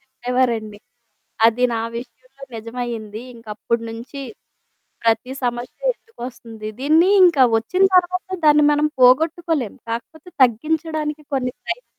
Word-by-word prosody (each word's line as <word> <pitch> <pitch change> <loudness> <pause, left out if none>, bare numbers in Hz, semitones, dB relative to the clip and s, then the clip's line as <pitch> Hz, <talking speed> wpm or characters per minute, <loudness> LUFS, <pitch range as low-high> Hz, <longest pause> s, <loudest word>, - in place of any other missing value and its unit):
చెప్పేవారండి. 245 -5 -2 0.7
అది 240 +2 +2
నా 225 - -1 0.2
విషయంలో 255 +3 -11
నిజమయింది. 230 -1 -6
ఇంకప్పుడి 230 +1 -3
నుంచి 240 +5 -8 0.8
ప్రతీ 230 +2 +1
సమస్య 240 0 -3 0.2
ఎందుకు 455 - -23
వస్తుంది? 225 -4 -9
దీన్ని 315 +6 +4 0.2
ఇంకా 315 -7 +5
వచ్చిన 330 +13 0
తర్వాత 365 +1 +1 0.2
దాన్ని 300 0 +6
మనం 295 +1 +2
పోగొట్టుకోలేం. 305 - +3 0.2
కాకపోతే 285 +9 -6
తగ్గించడానికి 305 +5 0
కొన్ని 255 -2 0
ప్రయత్నాలు - - -6
255 Hz, 110 wpm, -21 LUFS, 230-305 Hz, 0.8 s, దాన్ని